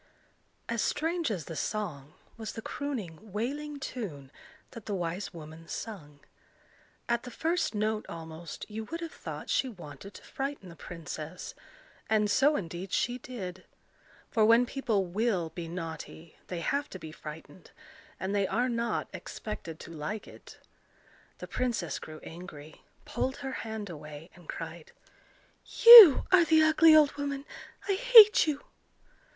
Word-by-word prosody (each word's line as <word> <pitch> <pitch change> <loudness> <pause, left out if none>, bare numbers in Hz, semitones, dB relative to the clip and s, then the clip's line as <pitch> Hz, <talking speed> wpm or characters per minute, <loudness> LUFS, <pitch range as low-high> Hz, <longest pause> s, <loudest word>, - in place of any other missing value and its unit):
As 235 -2 -1
strange 325 +1 -1
as 180 -9 -4
the 165 - -7
song, 155 -9 -4 0.2
was 220 -2 -7
the 225 - -7
crooning 220 - -6
wailing 285 +8 -4
tune 170 - -7 0.4
that 230 -4 -11
the 205 - -2
wise 175 +2 -4
woman 160 -1 -11
sung. 150 -10 -8 0.9
At 235 0 0
the 250 - -9
first 325 +1 -1
note 215 +1 -1
almost, 160 0 -8
you 220 +1 -6
would 330 +8 -6
have 335 - -5
thought - - -8
she 265 - +1
wanted 180 - -11
to - - -12
frighten 275 -8 -5
the 170 - -12
princess; 165 0 -8 0.6
and 210 -1 +2
so 285 +7 +4
indeed 175 - -5
she 245 +1 0
did. 190 -8 -8 0.7
For 220 - +2
when 230 +3 +5
people 235 -7 -1
will 185 -2 -1
be 165 0 -7
naughty, 165 -1 -8
they 175 -2 -5
have 285 - -1
to - - -8
be 160 -3 -9
frightened, 155 +2 -11 0.5
and 190 +1 -3
they 200 -1 +1
are 245 +2 0
not 235 0 -2
expected 170 -7 -7
to - - -10
like 165 +8 -5
it. - - -14 0.8
The - - -8
princess 235 -9 -2
grew 155 0 -10
angry, 160 -3 -11 0.2
pulled 265 +1 -2
her 265 - -3
hand 220 -4 -5
away, 150 0 -10
and 175 -2 -18
cried,— 165 -1 -8 0.9
"You 460 - +12
are 370 -2 +7
the 320 -1 +4
ugly 315 0 +6
old 300 -2 +6
woman. 280 -1 -4 0.4
I 400 - +2
hate 435 -3 +8
you!" 290 -2 -2
210 Hz, 150 wpm, -29 LUFS, 165-265 Hz, 0.9 s, You